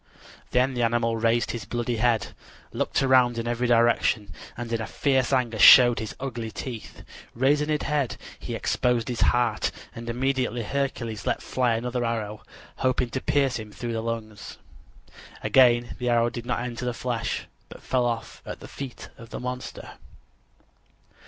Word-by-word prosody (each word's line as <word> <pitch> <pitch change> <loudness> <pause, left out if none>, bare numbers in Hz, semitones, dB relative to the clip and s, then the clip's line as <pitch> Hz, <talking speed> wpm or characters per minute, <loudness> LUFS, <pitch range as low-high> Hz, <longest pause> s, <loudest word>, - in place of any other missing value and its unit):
Then 130 +2 +2
the 120 - -2
animal 115 0 +1
raised 115 +1 +1
his 115 -3 -5
bloody 120 0 -2
head; 115 -1 +1 0.4
looked - - 0
around 130 -3 +4
in 115 0 -3
every 120 +1 0
direction, 115 -4 +2 0.2
and 120 -1 -5
in 115 -1 -1
fierce 135 -3 +1
anger 120 -4 +1
showed 120 +3 +9
his 110 - -5
ugly 120 -4 -4
teeth. 115 0 -7 0.3
Raising 145 +5 +2
his 150 -1 0
head, 145 -4 -1 0.2
he - - -5
exposed 120 -2 0
his 120 - -3
heart, 120 -4 +2 0.2
and 115 -1 -7
immediately 125 -1 -1
Hercules 125 -4 -3
let - - +1
fly 125 -3 +1
another 125 +1 -2
arrow, 110 -2 -3 0.4
hoping 130 -1 0
to 130 - -3
pierce 135 -4 +1
him 110 -1 -8
through 120 +2 -5
the 115 - -2
lungs. 110 -2 -5 0.9
Again 120 -2 +4
the 125 -1 -1
arrow 120 0 +3
did 120 0 -7
not 125 - -1
enter 120 0 -5
the 125 -1 -2
flesh, 120 -2 -2 0.2
but - - -12
fell 125 -2 +1 0.3
at - - -7
the - - -10
feet 135 -3 -8
of 115 -1 -11
the - - -6
monster. 125 +1 -6
120 Hz, 160 wpm, -26 LUFS, 115-125 Hz, 0.9 s, showed